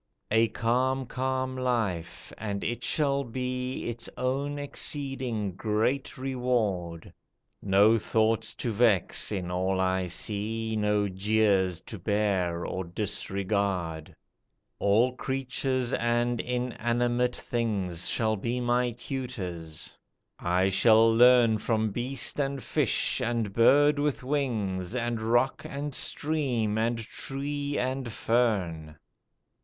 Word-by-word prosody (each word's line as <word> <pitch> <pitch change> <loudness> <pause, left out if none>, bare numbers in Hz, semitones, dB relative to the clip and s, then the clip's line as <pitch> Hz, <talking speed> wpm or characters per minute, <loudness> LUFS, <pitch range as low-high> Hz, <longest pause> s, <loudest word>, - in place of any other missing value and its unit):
"A 110 +1 +4
calm, 130 +4 0
calm 130 +1 -2
life, 110 -10 -2
and 100 -2 -3
it 120 - -3
shall 140 -2 +1
be 125 +1 -3
Its 120 0 -4
own 135 +3 -1
exceeding 135 -7 -2
great 110 +9 -1
reward! 115 -10 -2 0.5
No 105 +3 +4
thoughts 110 +1 0
to 120 - -2
vex 110 -4 +2
in 90 -3 -3
all 95 +1 0
I 95 0 +1
see, 110 +4 -2
No 105 -1 +1
jeers 95 -2 +1
to 110 - -9
bear 95 -4 0
or 95 - -3
disregard; 95 -3 -2 0.6
All 115 +6 +3
creatures 130 -1 -1
and 120 0 +1
inanimate 120 0 0
things 100 -8 -1
Shall 110 -1 +1
be 120 +5 -2
my 120 0 +1
tutors; 95 - -5 0.4
I 90 +2 +2
shall 110 +3 +5
learn 120 -2 +6
From 110 -1 0
beast, 125 +6 -1
and 140 -2 -1
fish, 140 -2 +1
and 115 -4 -1
bird 145 +6 +5
with 145 -2 -1
wings, 110 -9 -1
And 120 -2 -1
rock, 120 +4 +1
and 145 +1 -5
stream, 125 -9 0
and 115 +1 +1
tree, 140 +5 -3
and 130 -1 -2
fern." 95 -11 0
115 Hz, 110 wpm, -28 LUFS, 100-125 Hz, 0.6 s, learn